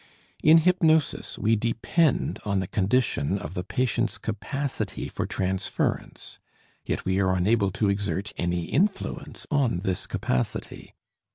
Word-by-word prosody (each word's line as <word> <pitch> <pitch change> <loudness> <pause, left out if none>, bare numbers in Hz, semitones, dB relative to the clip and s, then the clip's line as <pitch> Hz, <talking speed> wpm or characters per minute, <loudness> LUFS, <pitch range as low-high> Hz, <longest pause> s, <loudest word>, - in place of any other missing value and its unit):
In 155 +2 +7
hypnosis 160 -3 +2
we 110 +2 +2
depend 115 +7 +1
on 100 -2 0
the 95 - -1
condition 100 - +1
of 85 -3 -7
the 90 - -3
patient's 125 +3 0
capacity 135 -7 -3
for - - -3
transference, 95 0 -2 0.4
yet - - -3
we 95 +1 +1
are 95 -1 +2
unable 100 +2 +2
to 110 -1 +1
exert 100 0 -1
any 85 -1 -1
influence 195 - -1
on 130 - +1
this 95 -2 -2
capacity. 60 -1 -3
105 Hz, 125 wpm, -26 LUFS, 95-135 Hz, 0.4 s, In